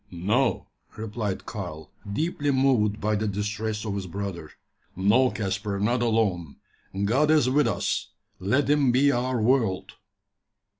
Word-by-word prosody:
"No," 105 Hz, +9 st, 0 dB, 0.3 s
replied 105 Hz, -2 st, -4 dB
Karl, 75 Hz, 0 st, -7 dB, 0.2 s
deeply 145 Hz, +4 st, -1 dB
moved 130 Hz, -6 st, +2 dB
by 110 Hz, +1 st, 0 dB
the 110 Hz, +1 st, -1 dB
distress 105 Hz, +2 st, -3 dB
of 105 Hz, -, -2 dB
his 100 Hz, -2 st, -4 dB
brother, 90 Hz, -4 st, -5 dB, 0.5 s
"no, 110 Hz, +8 st, +4 dB
Caspar, 100 Hz, -1 st, -3 dB
not 120 Hz, +4 st, +1 dB
alone 105 Hz, -9 st, 0 dB, 0.5 s
God 135 Hz, +8 st, +2 dB
is 155 Hz, -5 st, +4 dB
with 145 Hz, -1 st, +3 dB
us. -, -, -1 dB, 0.3 s
Let 130 Hz, +10 st, +1 dB
Him 145 Hz, -3 st, +3 dB
be 140 Hz, +3 st, +4 dB
our 125 Hz, -1 st, 0 dB
world." 110 Hz, -5 st, +1 dB
110 Hz, 135 wpm, -26 LUFS, 100-130 Hz, 0.5 s, no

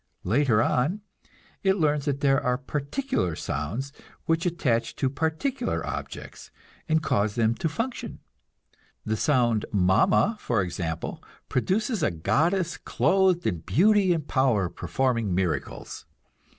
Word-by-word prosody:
Later 115 Hz, +2 st, +3 dB
on 155 Hz, -, 0 dB, 0.6 s
it 190 Hz, 0 st, +2 dB
learns 150 Hz, -4 st, +1 dB
that 140 Hz, -1 st, -1 dB
there 135 Hz, 0 st, +3 dB
are 125 Hz, -2 st, +1 dB
particular 140 Hz, -, -2 dB
sounds 110 Hz, -, -4 dB, 0.3 s
which 165 Hz, +2 st, +1 dB
attach 120 Hz, -9 st, 0 dB
to 130 Hz, -2 st, 0 dB
particular 160 Hz, -, -1 dB
objects, -, -, -7 dB, 0.4 s
and 160 Hz, 0 st, +2 dB
cause 100 Hz, -4 st, +1 dB
them 115 Hz, -1 st, +2 dB
to 165 Hz, -, -1 dB
function. 230 Hz, -, -4 dB, 0.9 s
The 110 Hz, -, 0 dB
sound 120 Hz, -4 st, +2 dB
"Mama," 105 Hz, -, +3 dB
for 115 Hz, -, 0 dB
example, 85 Hz, -2 st, -4 dB, 0.3 s
produces 205 Hz, -, 0 dB
a -, -, +3 dB
goddess 165 Hz, -, 0 dB
clothed 185 Hz, -2 st, +2 dB
in 85 Hz, -, 0 dB
beauty 195 Hz, -, +3 dB
and 160 Hz, -4 st, -1 dB
power, 120 Hz, -9 st, +2 dB
performing 115 Hz, -7 st, -1 dB
miracles. 85 Hz, -7 st, -3 dB
135 Hz, 125 wpm, -26 LUFS, 110-170 Hz, 0.9 s, Later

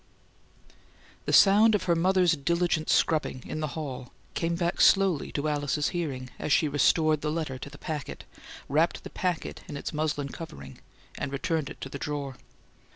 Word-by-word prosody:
The -, -, -1 dB
sound 210 Hz, +3 st, +6 dB
of 210 Hz, -, 0 dB
her 175 Hz, -2 st, +2 dB
mother's 180 Hz, +1 st, +3 dB
diligent 165 Hz, +1 st, 0 dB
scrubbing 150 Hz, -5 st, +1 dB
in 155 Hz, -, -5 dB
the 155 Hz, 0 st, -4 dB
hall 130 Hz, -5 st, -6 dB, 0.2 s
came 170 Hz, 0 st, -1 dB
back 170 Hz, 0 st, -1 dB
slowly 195 Hz, -6 st, +4 dB
to 145 Hz, +1 st, -1 dB
Alice's 145 Hz, +1 st, 0 dB
hearing, 135 Hz, -8 st, -4 dB
as -, -, -3 dB
she 155 Hz, -, +4 dB
restored 155 Hz, +2 st, +3 dB
the 150 Hz, -, -1 dB
letter 150 Hz, -5 st, -3 dB
to 140 Hz, -, -7 dB
the -, -, -12 dB
packet, 150 Hz, -4 st, -5 dB, 0.4 s
wrapped 155 Hz, +5 st, +1 dB
the -, -, -9 dB
packet 180 Hz, -3 st, -3 dB
in 145 Hz, -, -6 dB
its 140 Hz, -, -5 dB
muslin 150 Hz, -2 st, -1 dB
covering, 165 Hz, +1 st, -9 dB, 0.4 s
and 140 Hz, -, -3 dB
returned 150 Hz, +1 st, -1 dB
it -, -, -10 dB
to -, -, -4 dB
the 140 Hz, -, -7 dB
drawer. 140 Hz, -3 st, -4 dB
155 Hz, 170 wpm, -28 LUFS, 145-170 Hz, 0.4 s, sound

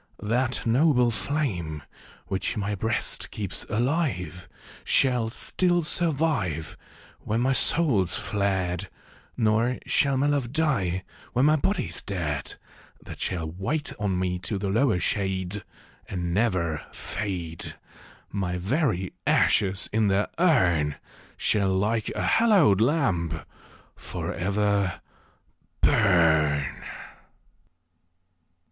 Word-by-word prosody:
That 120 Hz, +4 st, 0 dB
noble 125 Hz, 0 st, +3 dB
flame, 95 Hz, -, -2 dB, 0.4 s
which 95 Hz, +2 st, -2 dB
my 105 Hz, 0 st, -1 dB
Ijreast 110 Hz, +4 st, -1 dB
keeps 100 Hz, -3 st, -4 dB
alive. 110 Hz, -, -1 dB, 0.3 s
Shall 125 Hz, -4 st, +2 dB
still 175 Hz, +8 st, +1 dB
survive 145 Hz, -, 0 dB, 0.5 s
Wlien 110 Hz, +2 st, +1 dB
my 130 Hz, +2 st, +2 dB
soul's 115 Hz, -, +3 dB
fled; 95 Hz, -2 st, -1 dB, 0.5 s
Nor 115 Hz, +2 st, +2 dB
shall 140 Hz, -2 st, +2 dB
my 135 Hz, -, +2 dB
love 140 Hz, -5 st, 0 dB
die, 110 Hz, -, 0 dB, 0.3 s
when 125 Hz, +3 st, +3 dB
ray 155 Hz, +1 st, +5 dB
Ijody's 195 Hz, +8 st, -1 dB
dead; 80 Hz, -7 st, -3 dB, 0.5 s
That -, -, -9 dB
shall 85 Hz, -4 st, -2 dB
wait 120 Hz, -, -2 dB
on 100 Hz, -3 st, 0 dB
me 90 Hz, -1 st, -1 dB
to 100 Hz, +3 st, -2 dB
the 100 Hz, 0 st, -2 dB
lower 115 Hz, 0 st, +2 dB
shade, 95 Hz, +1 st, -1 dB, 0.5 s
And 90 Hz, -2 st, -3 dB
never 90 Hz, -, 0 dB
fade: 90 Hz, -5 st, -5 dB, 0.6 s
My 90 Hz, -3 st, -2 dB
very 100 Hz, -, 0 dB
ashes 95 Hz, -1 st, +2 dB
in 110 Hz, -1 st, +3 dB
their 100 Hz, +1 st, +1 dB
urn 85 Hz, -, +3 dB, 0.4 s
Shall, 95 Hz, -3 st, +1 dB
like 110 Hz, +3 st, 0 dB
a -, -, -2 dB
hallowed 190 Hz, -, +4 dB
lamp, 110 Hz, -, +1 dB, 0.5 s
for -, -, -5 dB
ever 100 Hz, 0 st, 0 dB, 0.8 s
burn. 80 Hz, -8 st, +3 dB
100 Hz, 105 wpm, -26 LUFS, 90-130 Hz, 0.8 s, ray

